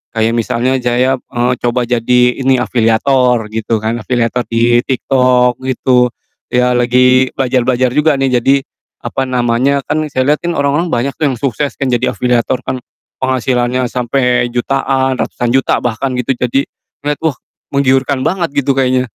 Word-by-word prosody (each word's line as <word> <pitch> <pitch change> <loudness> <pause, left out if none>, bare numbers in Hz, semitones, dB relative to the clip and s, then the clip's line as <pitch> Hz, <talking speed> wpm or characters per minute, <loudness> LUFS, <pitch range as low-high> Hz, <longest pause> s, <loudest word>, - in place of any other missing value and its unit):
kayak 110 +1 +1
misalnya 120 +3 0
jaya, 125 +2 +1
eee, 120 +1 -2
coba 120 +1 0
jadi 120 +1 +1 0.2
ini 135 0 +2
afiliator 125 0 +2
gitu 110 0 -2
kan, 115 +2 -1
afiliator 120 +1 -1
di 120 +1 +2
TikTok 125 -2 +2
gitu, 125 -1 +2 0.4
ya 125 0 +1
lagi 125 +1 +3
belajar-belajar 130 -1 +1
juga 150 +1 +2
nih 135 -2 +1
jadi 135 +3 +3 0.5
apa 135 - -2
namanya, 125 +3 +1
kan 155 0 -2
saya 135 0 0
liat 150 - +1
kan 170 0 -2
orang-orang 145 +5 0
banyak 130 -1 -1
tuh 150 - +2
yang 130 - -1
sukses 140 +3 -2
kan 135 - -1
jadi 120 - +1
afiliator 125 +1 0
kan, 130 - -3 0.4
penghasilannya 125 -1 0
sampe 125 0 0
jutaan, 130 +1 0
ratusan 120 -1 -2
juta 130 +2 +1
bahkan 125 +3 -2
gitu 125 +1 -1
jadi 125 +3 0 0.4
lihat, 150 - 0
wah 160 -3 +1 0.4
menggiurkan 135 0 +1
banget 170 -1 -1
gitu 135 0 0
kayaknya. 130 -1 +1
125 Hz, 155 wpm, -14 LUFS, 120-135 Hz, 0.5 s, lagi